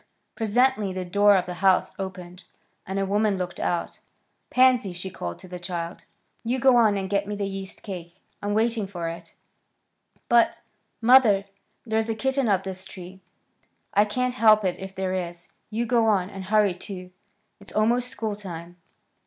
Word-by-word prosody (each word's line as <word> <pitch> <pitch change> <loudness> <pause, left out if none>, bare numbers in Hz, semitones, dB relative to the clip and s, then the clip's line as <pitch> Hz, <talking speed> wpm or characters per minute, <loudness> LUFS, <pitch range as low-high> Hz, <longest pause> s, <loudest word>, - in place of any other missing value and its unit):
Presently 220 -2 +2
the 185 0 -4
door 205 +3 +5
of 185 - +1
the 180 - -5
house 190 -2 +3
opened, 185 -1 -7 0.4
and 190 +1 -3
a 195 - +1
woman 205 0 +1
looked 180 -1 -4
out. 175 - -2 0.5
"Pansy," 255 -6 +4
she 185 +2 -6
called 90 - -5
to - - -13
the 180 0 -7
child, 175 -1 -5 0.4
"you 240 +3 0
go 260 0 +5
on 220 -4 +4
and 190 -1 -2
get 200 +1 0
me 210 - -3
the 200 -1 -2
yeast 195 -1 -5
cake. 175 -4 -7 0.3
I'm 205 0 -1
waiting 225 -2 +1
for 175 -4 -5
it." 165 +1 -9 0.9
"But, 235 -1 +3 0.4
mother, 225 -5 +6 0.4
there's 220 0 0
a 225 - 0
kitten 265 +2 0
up 195 -3 +2
this 190 -1 -5
tree." 190 0 -10 0.7
"I 205 +1 +5
can't 250 +4 -1
help 215 -4 +5
it 180 - -1
if 190 0 -8
there 190 -1 -2
is. 175 -1 -5 0.2
You 230 +2 -1
go 230 -1 +2
on, 195 -3 +2
and 195 -1 -7
hurry, 210 -1 +3
too. 180 0 -8 0.5
It's 200 - -12
almost 235 +3 +2
school 220 -3 -3
time." 175 -3 -9
200 Hz, 175 wpm, -25 LUFS, 185-220 Hz, 0.9 s, mother